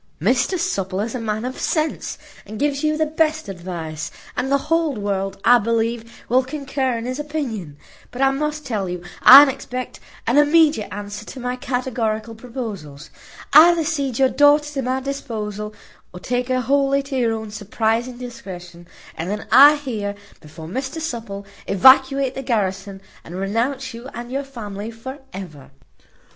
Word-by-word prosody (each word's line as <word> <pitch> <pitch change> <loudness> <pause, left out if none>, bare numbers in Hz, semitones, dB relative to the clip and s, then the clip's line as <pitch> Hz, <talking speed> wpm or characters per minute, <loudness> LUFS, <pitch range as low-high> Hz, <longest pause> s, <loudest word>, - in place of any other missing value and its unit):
Mr 250 - +1
Supple 195 - -2
is 220 +2 -3
a 255 - -3
man 215 0 -3
of 255 +1 -5
sense, 310 -1 -1 0.3
and 215 +2 -7
gives 285 +2 -1
you 305 0 +1
the 315 - +2
best 310 -2 0
advice; 170 -4 -6 0.3
and 265 +2 -2
the 280 - +5
whole 325 0 0
world, 195 -2 -2
I 245 0 +7
believe, 230 +1 -2
will 255 +2 +3
concur 270 -2 -2
in 230 - -5
his 255 +3 -4
opinion; 245 - -4 0.3
but 245 - -10
I 270 0 +4
must 300 +2 -3
tell 205 -6 -2
you 175 0 -5 0.2
I 280 +3 +11
expect 255 -2 -6 0.3
an 245 +5 +4
immediate 295 -6 +4
answer 205 +1 -6
to 260 - -9
my 250 0 -2
categorical 235 -3 -2
proposals. 215 - -7 0.4
Either 325 +2 +7
cede 280 -6 -1
your 265 -1 +4
daughter 295 +2 +4
to 275 - -2
my 260 +1 -1
disposal, 215 -6 -5 0.4
or 180 - -9
take 245 +5 -2
her 255 -1 +1
wholly 275 +2 +2
to 275 0 -6
your 235 -3 +1
own 220 -1 -5
surprizing 225 +4 -1
discretion, 180 -8 -9 0.3
and 165 +3 -4
then 210 +1 -3
I 285 +3 +9
here, 220 -8 -4 0.2
before 160 +1 -11
Mr 260 - -4
Supple, 230 -10 -5 0.2
evacuate 265 +5 +5
the 270 - -5
garrison, 195 -5 -2 0.2
and 170 - -9
renounce 230 +8 -2
you 235 +3 -9
and 240 +1 -7
your 275 +1 -2
family 215 -5 -7
for 260 +5 -8
ever." 155 -8 -9
245 Hz, 165 wpm, -21 LUFS, 205-275 Hz, 0.4 s, I